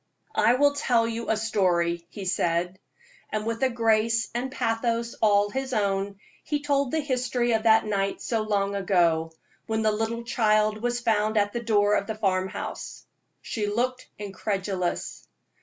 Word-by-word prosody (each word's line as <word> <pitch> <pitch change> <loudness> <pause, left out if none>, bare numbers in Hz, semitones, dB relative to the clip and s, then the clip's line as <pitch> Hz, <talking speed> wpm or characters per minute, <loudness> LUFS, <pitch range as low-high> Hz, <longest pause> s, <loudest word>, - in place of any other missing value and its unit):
"I 240 - +4
will 285 +2 +4
tell 245 -5 +2
you 230 0 -4
a 220 - +2
story," 175 -6 0
he 195 +2 -7
said. 175 0 0 0.5
And 215 0 -2
with 230 0 -3
a 265 - +3
grace 225 -1 +1
and 250 +2 -3
pathos 230 0 -1
all 205 -1 +4
his 265 +1 -3
own, 200 -2 0 0.3
he 295 -1 -1
told 280 -2 +1
the 320 - 0
history 250 -3 0
of 220 -1 +2
that 220 0 +5
night 195 -2 -1
so 225 -2 -1
long 200 -2 0
ago, 175 -5 +2 0.4
when 220 0 0
the 215 - +3
little 225 +2 -2
child 215 -2 +2
was 240 0 0
found 220 -2 +1
at 205 0 +2
the 235 - -2
door 210 -2 +2
of 200 - +1
the 220 - -3
farm 190 -3 0
house. - - -7 0.4
She 210 -3 -3
looked 250 +4 -2
incredulous. 195 -2 -3
215 Hz, 165 wpm, -26 LUFS, 200-235 Hz, 0.5 s, that